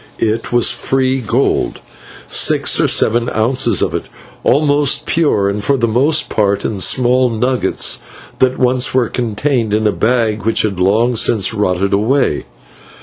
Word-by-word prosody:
It 110 +1 -2
was 120 -1 +3
free 130 0 0
gold, 120 +3 -1 0.5
six - - +1
or - - +2
seven 120 +2 +1
ounces 125 +4 +1
of - - -2
it, - - -3 0.4
almost 145 0 +1
pure, 145 -12 +1
and 100 +1 -3
for 140 +4 +1
the 115 -2 0
most 140 +8 +1
part 100 -1 0
in 105 - -3
small 125 +2 +2
nuggets, 125 +3 -1 0.4
that 130 0 +2
once 125 0 +1
were 125 -3 +1
contained 120 -1 -1
in 110 0 -1
a 105 - +3
bag 110 -1 0
which 115 - +1
had 100 -4 -2
long 110 +6 +2
since 110 -2 +1
rotted 100 -2 -1
away. 115 +8 0
120 Hz, 150 wpm, -15 LUFS, 105-130 Hz, 0.5 s, was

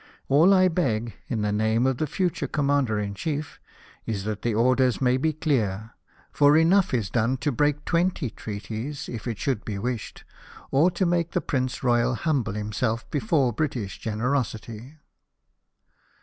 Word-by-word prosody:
All 155 +8 +6
I 185 -1 +5
beg, 120 -10 -1
in 110 -3 -2
the 105 - 0
name 110 +3 +1
of 130 -2 +1
the 155 - 0
future 175 +4 -1
Commander 140 -6 +1
in 100 -1 -3
Chief, 150 +8 -4 0.5
is 100 -4 -2
that 105 0 -4
the 115 -2 -1
orders 125 +2 +3
may 125 -1 +3
be 155 +5 +1
clear; 115 -9 -1 0.4
for 145 +1 +5
enough 180 +4 +4
is 110 -7 -1
done 120 +3 +1
to 145 +3 -1
break 145 +2 0
twenty 170 -7 0
treaties, 110 +6 -6
if 115 +1 -6
it 115 -3 -3
should 125 -4 -1
be 105 -3 -4
wished, 120 +2 -4 0.5
or 150 +7 +4
to 185 +1 -1
make 170 -1 0
the - - +2
Prince 130 -5 -2
Royal, 120 0 +2
humble 135 -8 -1
himself 105 +2 -2
before 145 - +1
British 120 -7 -3
generosity." 115 +2 -3
125 Hz, 160 wpm, -25 LUFS, 110-150 Hz, 0.5 s, All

